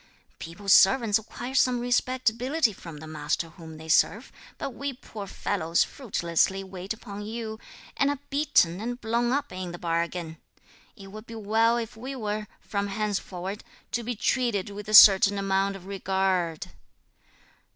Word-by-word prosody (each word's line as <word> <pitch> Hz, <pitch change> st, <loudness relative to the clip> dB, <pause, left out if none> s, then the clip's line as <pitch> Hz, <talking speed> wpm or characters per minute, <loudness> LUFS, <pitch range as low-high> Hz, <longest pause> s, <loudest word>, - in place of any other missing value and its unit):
People's 190 Hz, +4 st, 0 dB
servants 210 Hz, +1 st, +5 dB
acquire 240 Hz, +3 st, -8 dB
some 255 Hz, -2 st, +3 dB
respectability 250 Hz, +2 st, +1 dB
from 165 Hz, -4 st, -10 dB
the 155 Hz, -, -10 dB
master 155 Hz, +1 st, -2 dB
whom 160 Hz, -2 st, -12 dB
they 160 Hz, +1 st, -11 dB
serve, 205 Hz, +8 st, +2 dB, 0.3 s
but -, -, -4 dB
we 280 Hz, +3 st, -4 dB
poor 215 Hz, -5 st, -9 dB
fellows 170 Hz, -3 st, 0 dB
fruitlessly 190 Hz, -, -1 dB
wait 190 Hz, 0 st, -8 dB
upon 205 Hz, -2 st, -6 dB
you, 220 Hz, 0 st, -5 dB, 0.4 s
and 275 Hz, -, +2 dB
are 285 Hz, -, -1 dB
beaten 275 Hz, -, +2 dB
and 240 Hz, +2 st, -4 dB
blown 235 Hz, +1 st, 0 dB
up 285 Hz, +2 st, -1 dB
in 185 Hz, -1 st, -5 dB
the 175 Hz, -, -7 dB
bargain. 170 Hz, -1 st, -3 dB, 0.6 s
It 195 Hz, -1 st, -12 dB
would 215 Hz, +2 st, -10 dB
be 230 Hz, -, -9 dB
well 225 Hz, +2 st, +2 dB
if 230 Hz, -2 st, -5 dB
we 260 Hz, +5 st, -6 dB
were, 210 Hz, -3 st, -3 dB
from 200 Hz, -1 st, -2 dB
henceforward, 200 Hz, -1 st, -3 dB, 0.3 s
to 230 Hz, +4 st, -1 dB
be 240 Hz, +1 st, -4 dB
treated 215 Hz, -3 st, 0 dB
with 205 Hz, +1 st, -8 dB
a 215 Hz, -, +4 dB
certain 200 Hz, 0 st, +9 dB
amount 195 Hz, 0 st, 0 dB
of 190 Hz, -2 st, -11 dB
regard." 190 Hz, -4 st, -1 dB
205 Hz, 155 wpm, -27 LUFS, 185-235 Hz, 0.6 s, certain